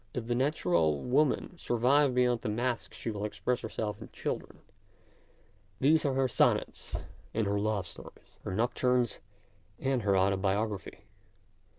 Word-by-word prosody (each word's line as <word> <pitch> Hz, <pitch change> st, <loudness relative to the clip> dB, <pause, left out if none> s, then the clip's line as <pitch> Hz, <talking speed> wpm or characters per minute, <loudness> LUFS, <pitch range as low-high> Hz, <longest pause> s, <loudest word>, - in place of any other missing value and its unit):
If 125 Hz, -, -3 dB
the 120 Hz, -, 0 dB
natural 90 Hz, -, +2 dB
woman 145 Hz, +6 st, +1 dB
survive 130 Hz, +3 st, +3 dB
behind 125 Hz, -2 st, +3 dB
the -, -, -2 dB
mask 120 Hz, +2 st, -1 dB
she 115 Hz, -, -4 dB
will 105 Hz, -1 st, -4 dB
express 120 Hz, +3 st, -1 dB
herself 105 Hz, -2 st, -4 dB
in -, -, -9 dB
children; -, -, -5 dB, 1.2 s
these 155 Hz, +3 st, +4 dB
are 135 Hz, -2 st, +1 dB
her 135 Hz, 0 st, +3 dB
sonnets -, -, +1 dB, 0.4 s
and 110 Hz, -1 st, +1 dB
her 100 Hz, 0 st, 0 dB
love 105 Hz, -2 st, 0 dB
stories, -, -, -12 dB
her 95 Hz, -, -3 dB
nocturnes 125 Hz, +1 st, +1 dB, 0.6 s
and 135 Hz, -2 st, 0 dB
her 100 Hz, -2 st, +2 dB
autobiograplry. 95 Hz, +2 st, 0 dB
120 Hz, 135 wpm, -30 LUFS, 100-130 Hz, 1.2 s, these